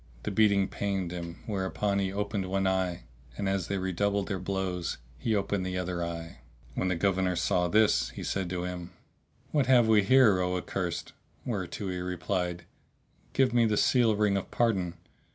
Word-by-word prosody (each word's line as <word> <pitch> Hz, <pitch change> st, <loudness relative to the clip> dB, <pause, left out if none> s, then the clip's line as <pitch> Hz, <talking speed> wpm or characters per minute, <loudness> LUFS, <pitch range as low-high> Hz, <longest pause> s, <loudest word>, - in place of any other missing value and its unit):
The -, -, -2 dB
beating 100 Hz, -1 st, +4 dB
pained 95 Hz, -4 st, -2 dB
him, 85 Hz, -1 st, -7 dB
whereupon 100 Hz, 0 st, -1 dB
he 95 Hz, -1 st, 0 dB
opened 100 Hz, -1 st, -2 dB
one 95 Hz, +1 st, 0 dB
eye 95 Hz, -2 st, 0 dB, 0.3 s
and, 100 Hz, -, -1 dB
as 95 Hz, -3 st, 0 dB
they 100 Hz, -, -1 dB
redoubled 100 Hz, +2 st, 0 dB
their 95 Hz, -3 st, -2 dB
blows, 90 Hz, -2 st, -2 dB, 0.2 s
he 115 Hz, -2 st, 0 dB
opened 100 Hz, -1 st, 0 dB
the 90 Hz, 0 st, -3 dB
other 90 Hz, -1 st, -2 dB
eye. 85 Hz, -4 st, -6 dB, 0.3 s
When 95 Hz, -, -1 dB
the 95 Hz, -, +1 dB
Governor 95 Hz, 0 st, +1 dB
saw 90 Hz, +1 st, +1 dB
this 95 Hz, -, +3 dB
he -, -, -8 dB
said 95 Hz, -2 st, -2 dB
to 90 Hz, -1 st, -2 dB
him, 90 Hz, -1 st, -6 dB, 0.6 s
"What 145 Hz, -5 st, +2 dB
have 125 Hz, -3 st, +6 dB
we 110 Hz, -2 st, +6 dB
here, 110 Hz, -2 st, +5 dB
O 90 Hz, 0 st, 0 dB
accursed?"; 90 Hz, -2 st, -3 dB, 0.3 s
whereto 100 Hz, -3 st, -3 dB
he 90 Hz, -, -3 dB
replied, 90 Hz, 0 st, -2 dB, 0.7 s
"Give 130 Hz, -2 st, +3 dB
me 120 Hz, -2 st, +4 dB
the 105 Hz, -1 st, +1 dB
seal 120 Hz, -4 st, +4 dB
ring 105 Hz, -1 st, +2 dB
of 95 Hz, -, -4 dB
pardon! 95 Hz, -8 st, +1 dB
95 Hz, 175 wpm, -29 LUFS, 90-100 Hz, 0.7 s, have